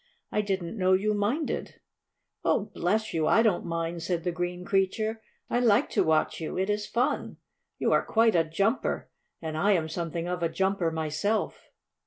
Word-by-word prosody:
I 210 - +1
didn't 195 0 -3
know 185 0 +4
you 210 +3 +2
minded." 225 +10 -2 0.6
"Oh, - - +1
bless 215 +5 0
you, 160 -2 +1
I 225 - +5
don't 200 -6 +1
mind," 165 0 -2
said 170 0 -2
the 175 - 0
green 175 +1 -4
creature. 215 +4 0 0.3
"I 245 - +1
like 225 -4 +3
to - - +3
watch 160 +1 +1
you. 160 - -4
It 190 +2 +1
is 210 0 -2
fun. 240 +2 -1 0.4
You - - +1
are - - +4
quite 225 0 +3
a 165 - +4
jumper, 200 +10 -1 0.3
and 160 -1 -3
I 200 +6 +3
am 165 -4 +1
something 170 0 -3
of 180 -1 -3
a 165 - +1
jumper 190 +1 0
myself." 160 +7 -2
185 Hz, 180 wpm, -28 LUFS, 165-210 Hz, 0.6 s, I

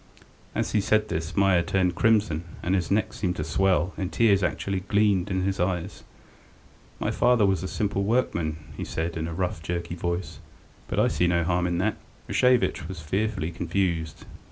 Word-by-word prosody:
As - - -1
he 105 - +2
said 110 +1 +2
this 80 +1 -3
Meier 95 -3 +4
turned 90 +1 +1
crimson, 105 -6 +2 0.2
and 90 - 0
his 90 -4 0
neck 105 +2 +1
seemed 90 -3 -2
to 75 - -3
swell, 90 +3 +1
and 95 -1 -2
tears 105 -4 +4
actually 90 +2 -1
gleamed 100 -1 +2
in 95 -1 0
his 95 0 -1
eyes. 90 +1 -2 1.0
"My - - -1
father 120 -3 +3
was 95 -1 +1
a 95 - -3
simple 100 0 -1
workman," 85 -8 0 0.2
he - - -5
said, 80 +1 -3
in 80 -1 -2
a 85 - -5
rough, 90 -3 -2
jerky 85 +1 -3
voice, 85 +1 -3 0.5
"but - - -4
I - - +4
see 90 - +1
no 85 -1 +2
harm 90 +1 +1
in 85 -1 -1
that." 105 +4 0 0.3
Rashevitch 125 -10 +2
was 95 -1 -7
fearfully 95 +1 -1
confused. 85 -2 -2
90 Hz, 180 wpm, -26 LUFS, 85-100 Hz, 1.0 s, Meier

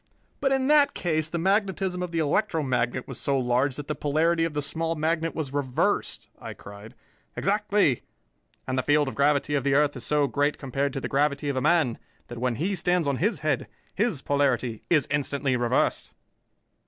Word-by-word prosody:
"But 270 -1 +1
in 265 -1 +1
that 290 0 +4
case 155 -3 -1
the 170 - -3
magnetism 190 0 0
of 180 - -3
the 170 - -4
electromagnet 140 - 0
was 130 -2 -6
so 140 -1 +1
large 125 +2 +1
that 145 -1 -7
the 150 - -1
polarity 160 +4 +1
of 165 -3 -4
the 150 - 0
small 165 +3 -2
magnet 165 +1 -1
was 145 -4 -3
reversed!" 135 -3 -1
I - - -7
cried. 105 +2 -12 0.4
"Exactly, 205 - +1 0.6
and 130 0 -1
the - - +2
field 145 +1 +2
of 135 - -3
gravity 145 +1 +1
of 140 -3 +1
the 140 0 +2
earth 145 0 +3
is 125 - -6
so 150 -1 +2
great 145 +1 0
compared 135 +1 -2
to 135 - -4
the - - -3
gravity 145 +1 0
of 140 - -1
a 130 - 0
man 150 -6 +2 0.3
that 120 -1 -7
when 125 -1 0
he 180 - -1
stands 180 -2 +1
on 140 -2 0
his 210 - 0
head, 150 -4 0 0.3
his 195 - -1
polarity 130 -5 0
is 155 -5 +3
instantly 140 -2 0
reversed." 120 +1 0
145 Hz, 190 wpm, -26 LUFS, 135-165 Hz, 0.6 s, that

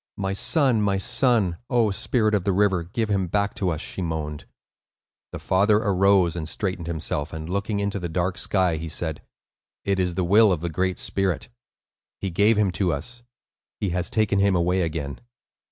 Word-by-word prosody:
"My 95 -1 -2
son, 130 +1 +3
my 100 -1 +1
son! 115 -4 +2
O 115 -4 +2
spirit 110 +2 0
of 100 -4 +1
the 100 - +1
river, 95 -2 +2
give 105 +7 -3
him 95 -3 0
back 100 +3 0
to 100 -4 -1
us!" 80 -2 -2
she - - -6
moaned. 80 -3 -4 0.9
The - - -5
father 100 +3 +2
arose 100 -4 +3
and 80 -2 -4
straightened 90 -4 -3
himself, 80 -2 -3
and, 80 0 -6
looking 100 +3 -2
into 100 0 -2
the 85 -1 -4
dark 90 +3 -1
sky, 95 -5 +1
he 80 +1 -5
said: 80 -1 -3 0.6
"It 100 -1 0
is 90 -2 0
the 95 - 0
will 105 +3 +5
of 85 -4 -1
the 85 -1 -3
Great 95 +3 -1
Spirit. 95 -1 -2 0.7
He 95 - -3
gave 105 +5 +3
him 105 -3 +2
to 90 -1 0
us. 120 +12 -5 0.6
He 100 - -1
has 90 0 -1
taken 105 -3 +1
him 100 -1 +3
away 90 +2 +1
again." 75 -4 -3
95 Hz, 185 wpm, -24 LUFS, 85-100 Hz, 0.9 s, will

